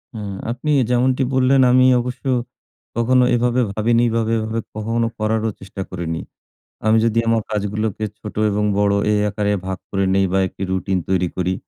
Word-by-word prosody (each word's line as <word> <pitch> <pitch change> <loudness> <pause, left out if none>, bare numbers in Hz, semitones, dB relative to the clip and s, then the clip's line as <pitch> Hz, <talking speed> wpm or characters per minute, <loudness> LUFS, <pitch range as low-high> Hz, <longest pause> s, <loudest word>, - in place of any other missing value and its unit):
হ্যাঁ 100 -3 -5 0.2
আপনি 130 +5 -2 0.2
যেমনটি 130 +2 +2
বললেন 130 +1 +4
আমি 130 0 +5 0.2
অবশ্য 125 +3 -6 0.7
কখনো 125 +2 +3
এভাবে 125 +1 +1
ভাবিনি 115 +3 +2
বা - - +2 0.2
এইভাবে, 115 +1 -1
এভাবে 110 +1 -2 0.2
কখনো 115 +2 -1
করারও 110 +1 0
চেষ্টা 95 0 -8
করিনি। 85 -3 -4 0.6
আমি 110 +1 +4
যদি 115 0 +2
আমার 115 -1 +2
কাজগুলোকে 105 0 -2 0.2
ছোটো 105 0 -6
এবং 105 +1 0
বড়ো 100 0 +2
এই 105 - +2
আকারে 105 0 -1
ভাগ 95 0 -3
করে 100 -1 0
নিই 95 0 +3
বা 95 - +3
একটি 95 - -7
রুটিন 95 0 0
তৈরি 90 -1 +2
করি 90 0 0
110 Hz, 170 wpm, -20 LUFS, 100-120 Hz, 0.7 s, আমি